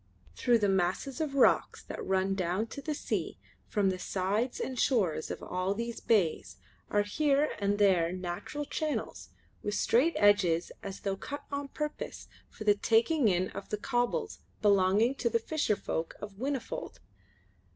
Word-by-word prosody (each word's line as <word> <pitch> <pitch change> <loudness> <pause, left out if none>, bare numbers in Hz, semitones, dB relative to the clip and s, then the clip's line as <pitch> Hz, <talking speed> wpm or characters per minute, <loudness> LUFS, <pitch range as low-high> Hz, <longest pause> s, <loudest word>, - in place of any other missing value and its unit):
Through 240 -2 +3
the 210 -2 +1
masses 190 - 0
of 290 -3 -2
rocks 270 - +3
that - - -6
run 190 0 +1
down 185 +2 0
to 280 - -7
the 305 +1 -3
sea - - -3 0.3
from 200 -2 +2
the 185 - -4
sides 205 +7 -1
and 260 -2 -3
shores 185 - +1
of - - -6
all 185 +2 -1
these 235 +1 -4
bays 195 -8 +1 0.3
are 205 - +2
here 290 +7 +2
and 200 0 +1
there 185 -5 +4
natural 185 +11 -4
channels 305 +1 -3 0.3
with 205 0 -2
straight 285 +9 +3
edges 190 -5 +3
as 195 -1 -7
though 195 -1 -2
cut 285 +8 -6
on 280 0 -3
purpose 300 +2 -5 0.2
for 215 - -9
the 210 -1 +5
taking 230 +6 +3
in 185 -1 +2
of 195 - -8
the 210 - -1
cobbles 245 - -1 0.2
belonging 205 +4 +4
to 250 -3 -1
the 230 - +2
fisher 260 -2 0
folk 165 -4 -3
of 205 -1 -7
Whinnyfold. 265 +5 -4
210 Hz, 160 wpm, -30 LUFS, 190-265 Hz, 0.3 s, the